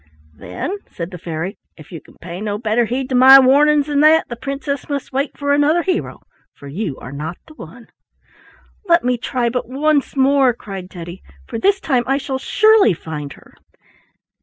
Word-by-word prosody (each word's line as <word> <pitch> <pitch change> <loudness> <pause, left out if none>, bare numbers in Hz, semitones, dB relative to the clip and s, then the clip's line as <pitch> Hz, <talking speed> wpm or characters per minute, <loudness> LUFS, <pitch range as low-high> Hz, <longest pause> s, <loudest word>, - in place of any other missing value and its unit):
"Then," 375 - -6
said 170 0 -7
the 180 - -9
fairy, 165 +4 -5 0.2
"if 155 - -15
you 165 - -8
can - - -20
pay 175 +2 -8
no 205 -1 -3
better 225 +2 0
heed 250 +4 -3
to - - -3
my 260 +2 +9
warnings 285 +2 +4
than 290 -1 -1
that, 310 +2 +4
the 240 - -5
princess 275 +3 -5
must 280 -2 -4
wait 275 +2 -2
for 285 0 0
another 300 +4 +2
hero, 370 -2 -3 0.3
for 140 - -13
you 160 0 -4
are 125 - -10
not 155 +5 -6
the 310 - -16
one." 230 - -12 1.0
"Let 340 0 +4
me 250 -1 0
try 245 0 -2
but 245 0 -4
once 290 +2 0
more," 270 -1 +3
cried 195 -5 -9
Teddy, 175 0 -9 0.2
"for - - -6
this 395 - +2
time 255 -8 0
I 270 +1 +1
shall 265 -1 -4
surely 435 - +4
find 150 -3 -7
her." - - -20
255 Hz, 185 wpm, -18 LUFS, 185-285 Hz, 1.0 s, my